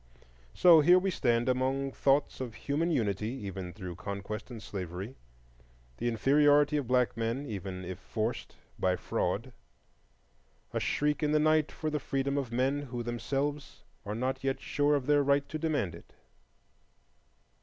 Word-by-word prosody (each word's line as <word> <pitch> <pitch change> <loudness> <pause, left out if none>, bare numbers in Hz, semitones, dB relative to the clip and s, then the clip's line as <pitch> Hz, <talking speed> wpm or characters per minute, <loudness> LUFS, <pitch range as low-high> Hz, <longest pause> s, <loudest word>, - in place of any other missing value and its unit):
So 170 -3 +8
here 175 +4 +7
we 190 +1 +1
stand 120 -6 +1
among 130 +2 0
thoughts 140 0 +1
of 120 -4 -5
human 150 +7 -1
unity, 105 - 0 0.2
even 95 -2 -5
through 90 -3 -8
conquest 100 +4 -5
and 120 -3 -7
slavery; 95 +3 -6 0.8
the 120 - -2
inferiority 145 +5 +4
of 140 -5 -2
black 125 -1 +2
men, 115 +5 -2
even 95 -5 -5
if 95 +1 -6
forced 110 +4 -3 0.2
by 90 0 +2
fraud; - - -2 1.2
a - - 0
shriek 150 +1 0
in 150 -1 +1
the 155 - +4
night 155 0 +3
for 155 -1 -3
the 150 - -1
freedom 135 0 -1
of 135 -5 -2
men 130 +4 +1
who 125 -4 -5
themselves 140 +5 -3 0.2
are 105 0 -4
not 130 +3 -2
yet 135 0 0
sure 145 0 +1
of 140 -3 -1
their 145 0 +4
right 140 0 +2
to 155 - -4
demand 150 - -1
it. 85 - -14
130 Hz, 155 wpm, -30 LUFS, 110-145 Hz, 1.2 s, So